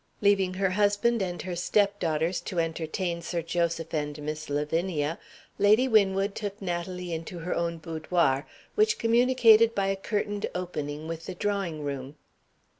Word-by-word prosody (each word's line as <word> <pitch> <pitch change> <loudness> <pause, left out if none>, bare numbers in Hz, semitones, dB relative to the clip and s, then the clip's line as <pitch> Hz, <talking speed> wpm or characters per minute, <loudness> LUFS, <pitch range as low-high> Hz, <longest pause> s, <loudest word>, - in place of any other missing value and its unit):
Leaving 195 -3 +3
her 190 0 +1
husband 205 +3 +2
and 175 -2 -3
her 180 -2 -4
stepdaughters 175 -3 +1
to 185 - -6
entertain 165 +2 -2
Sir 170 0 -3
Joseph 170 -1 -1
and 150 -1 -2
Miss 155 0 -5
Lavinia, 150 +2 -1 0.4
Lady 215 +6 +5
Winwood 200 -3 +3
took 205 -1 -5
Natalie 180 -1 -4
into 165 +2 -5
her 170 +2 -3
own 170 0 -1
boudoir, 160 -3 0 0.3
which 435 +1 +3
communicated 230 -1 +5
by 195 - +1
a 195 - +1
curtained 205 +1 -2
opening 155 -4 -4
with 165 0 -6
the 185 - -5
drawing 190 -6 -2
room. 140 0 -5
180 Hz, 145 wpm, -27 LUFS, 160-205 Hz, 0.4 s, Lady